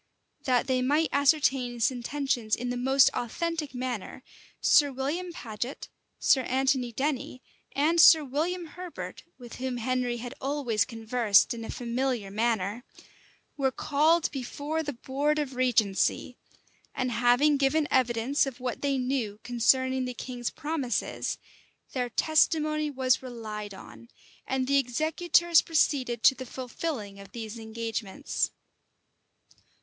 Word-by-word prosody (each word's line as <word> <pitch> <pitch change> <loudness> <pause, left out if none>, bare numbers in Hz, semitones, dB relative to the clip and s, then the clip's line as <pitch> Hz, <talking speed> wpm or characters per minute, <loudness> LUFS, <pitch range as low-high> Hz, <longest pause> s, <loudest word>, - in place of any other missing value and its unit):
[] - - -34
That 250 -3 +2
they 260 -1 +1
might 295 +5 +2
ascertain 275 -3 +2
his 235 0 +1
intentions 245 -3 -1
in 245 +1 -4
the - - -2
most 265 +2 +4
authentic 310 +4 -3
manner 250 -1 -5 0.4
Sir 290 -2 +5
William 295 +8 -3
Paget, 240 -3 -6 0.3
Sir 265 - +4
Anthony 260 -1 0
Denny, 265 0 -3 0.3
and 325 +4 +3
Sir 315 -2 +8
William 335 +7 -2
Herbert, 355 +2 -8
with 240 -2 -10
whom 255 -1 -3
Henry 250 0 -1
had 245 +2 -7
always 265 -6 0
conversed 225 -3 +2
in 230 -1 -7
a - - -7
familiar 240 -3 -2
manner, 220 0 -1 0.7
were 270 -2 +2
called 305 +5 +2
before 290 +4 -3
the 290 -2 -4
board 280 +5 -1
of 290 -3 -2
regency; 245 -1 +1 0.6
and 255 -2 -1
having 245 +6 +3
given 290 +2 +2
evidence 250 +2 +2
of 265 -2 -7
what 250 -1 -4
they 280 -1 +1
knew 250 -5 -2
concerning 260 +2 +2
the 250 -1 -5
king's 245 -2 -4
promises, 300 -6 -3 0.6
their 250 -2 -1
testimony 305 +2 +2
was 260 -2 +1
relied 215 -5 -7
on, 115 - -13 0.4
and 265 -1 0
the 280 +1 +3
executors 320 +6 +3
proceeded 260 -7 0
to - - +7
the 260 0 -8
fulfilling 245 -5 -5
of 200 - -13
these 230 -1 -6
engagements. 225 +2 -3
255 Hz, 135 wpm, -28 LUFS, 240-285 Hz, 0.7 s, Sir